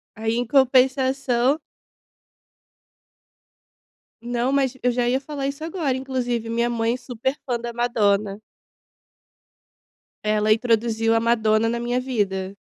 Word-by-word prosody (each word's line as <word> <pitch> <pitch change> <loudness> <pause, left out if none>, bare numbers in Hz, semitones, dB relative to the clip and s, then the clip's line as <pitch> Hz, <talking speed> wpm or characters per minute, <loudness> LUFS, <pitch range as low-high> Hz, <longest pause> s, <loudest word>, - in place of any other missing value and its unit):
Aí 225 +1 -1
em 245 +1 -1
compensação 265 0 +3 2.7
Não, 245 +2 -1
mas 270 -2 +1
eu 250 - +3
já 240 0 0
ia 260 +2 +1
falar 280 -1 -4
isso 280 +3 -6
agora, 320 -6 -1
inclusive, 250 -3 -2
minha 235 +1 0
mãe 230 0 0
super 245 0 -3
é - - -15
fã 245 -3 -1
da 235 0 -6
Madonna. 210 -4 0 1.8
Ela 215 0 +2
introduziu 225 0 +1
a - - +2
Madonna 225 -1 +2
na 235 +1 -2
minha 245 +1 -1
vida. 200 -6 -2
240 Hz, 125 wpm, -23 LUFS, 225-260 Hz, 2.7 s, compensação